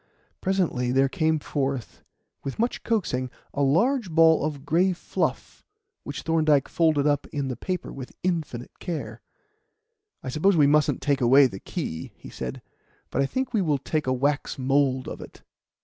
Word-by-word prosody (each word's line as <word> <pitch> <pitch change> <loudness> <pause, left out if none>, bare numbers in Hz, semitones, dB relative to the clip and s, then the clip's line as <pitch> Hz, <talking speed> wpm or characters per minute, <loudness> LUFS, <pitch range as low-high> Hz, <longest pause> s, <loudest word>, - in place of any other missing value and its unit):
Presently 175 -10 0
there 135 +1 +4
came 160 +1 +1
forth, 135 -4 -3 0.4
with 135 - -5
much 235 +2 -1
coaxing, 130 - -1 0.2
a 145 - -1
large 200 - +2
ball 160 -1 +5
of 145 -2 -3
grey 180 +5 +3
fluff, 175 - -3 0.4
which - - -6
Thorndyke 155 -4 +3
folded 155 -4 +2
up 145 -1 +1
in 140 -2 -3
the 130 - -3
paper 180 - -4
with 130 -2 -9
infinite 160 -9 -3
care. 135 - -5 1.0
"I 130 - -4
suppose 170 +7 +2
we 150 - +6
mustn't 150 +1 +2
take 140 -2 +1
away 135 +3 +7
the 95 -7 -3
key," 80 +1 -5
he - - -12
said, 65 -1 -6 0.5
"but - - +1
I 135 - +2
think 260 - -3
we 215 - +2
will 155 -5 +1
take 150 +2 -2
a - - +2
wax 145 +4 0
mould 135 -1 +1
of - - -6
it." - - -12
145 Hz, 165 wpm, -25 LUFS, 135-165 Hz, 1.0 s, away